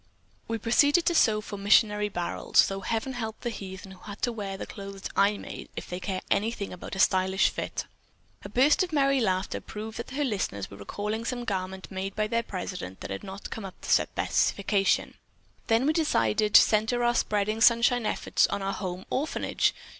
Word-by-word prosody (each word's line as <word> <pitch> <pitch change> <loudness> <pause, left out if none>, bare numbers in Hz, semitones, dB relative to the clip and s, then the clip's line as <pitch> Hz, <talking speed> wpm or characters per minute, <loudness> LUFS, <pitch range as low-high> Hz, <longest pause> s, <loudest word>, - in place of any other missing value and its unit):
We 230 - -1
proceeded 285 - +3
to 345 - +3
sew 215 -9 +4
for 205 -1 -7
missionary 210 +1 +3
barrels, 175 -3 +2
though 195 0 -3
heaven 225 +7 -2
help 220 -3 -5
the 240 - -2
heathen 190 -2 -8
who 190 - -13
had 205 0 -9
to 240 - +2
wear 200 -4 -5
the - - -5
clothes 195 -1 -7
I 205 +1 +3
made - - -8
if - - -6
they 180 - -5
care 185 0 -3
anything 210 -2 0
about 180 - -7
a - - -5
stylish 190 0 +3
fit." - - -4 0.6
A 200 - -7
burst 265 - +4
of 370 -2 -1
merry 275 -3 +3
laughter 185 -2 -1
proved 215 +1 -7
that 235 - -5
her 285 +3 -2
listeners 190 - -2
were 100 - -10
recalling 210 - -4
some 245 +1 -3
garment 190 -2 -3
made 190 +1 -4
by 215 - +1
their 230 +2 0
president 180 - -6
that - - -6
had 95 - -5
not 195 +1 -8
come 225 - -5
up 190 -1 -9
to - - -4
specifications. 200 0 +1 0.5
"Then 230 +3 +3
we 305 - +3
decided 210 - +1
to - - +12
center 225 +3 +1
our 240 0 +3
spreading 215 -1 0
sunshine 235 0 +4
efforts - - +2
on 200 - -3
our 195 0 -1
home 185 -1 -5
orphanage. 295 +4 0
210 Hz, 195 wpm, -27 LUFS, 190-230 Hz, 0.6 s, to